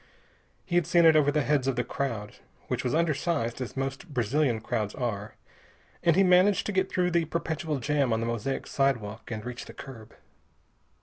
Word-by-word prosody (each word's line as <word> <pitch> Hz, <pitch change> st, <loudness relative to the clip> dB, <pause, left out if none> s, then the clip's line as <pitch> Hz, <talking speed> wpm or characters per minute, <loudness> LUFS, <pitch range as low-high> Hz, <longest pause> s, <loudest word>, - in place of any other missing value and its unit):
He'd 175 Hz, -3 st, +1 dB
seen 170 Hz, -1 st, +4 dB
it 160 Hz, -1 st, +7 dB
over 150 Hz, -2 st, +5 dB
the 150 Hz, 0 st, +1 dB
heads 140 Hz, -2 st, +1 dB
of 135 Hz, -, +1 dB
the 120 Hz, -, 0 dB
crowd, 115 Hz, -5 st, -4 dB, 0.3 s
which -, -, -1 dB
was 125 Hz, -, 0 dB
undersized, 155 Hz, -6 st, 0 dB
as 125 Hz, -, -6 dB
most 135 Hz, +6 st, -4 dB
Brazilian 120 Hz, +1 st, +1 dB
crowds 110 Hz, -2 st, -2 dB
are, 110 Hz, -4 st, -3 dB, 0.7 s
and 170 Hz, -2 st, +3 dB
he 195 Hz, -, +5 dB
managed 185 Hz, +2 st, +4 dB
to -, -, -1 dB
get 190 Hz, -1 st, 0 dB
through 180 Hz, -1 st, +1 dB
the 170 Hz, -1 st, +2 dB
perpetual 160 Hz, -1 st, -2 dB
jam 140 Hz, -1 st, +1 dB
on 110 Hz, -, +1 dB
the 115 Hz, -, -2 dB
mosaic 115 Hz, +3 st, -2 dB
sidewalk 120 Hz, -6 st, -1 dB
and 110 Hz, -1 st, -5 dB
reach 125 Hz, -1 st, -6 dB
the -, -, -11 dB
curb. 115 Hz, -5 st, -11 dB
135 Hz, 185 wpm, -28 LUFS, 120-165 Hz, 0.7 s, it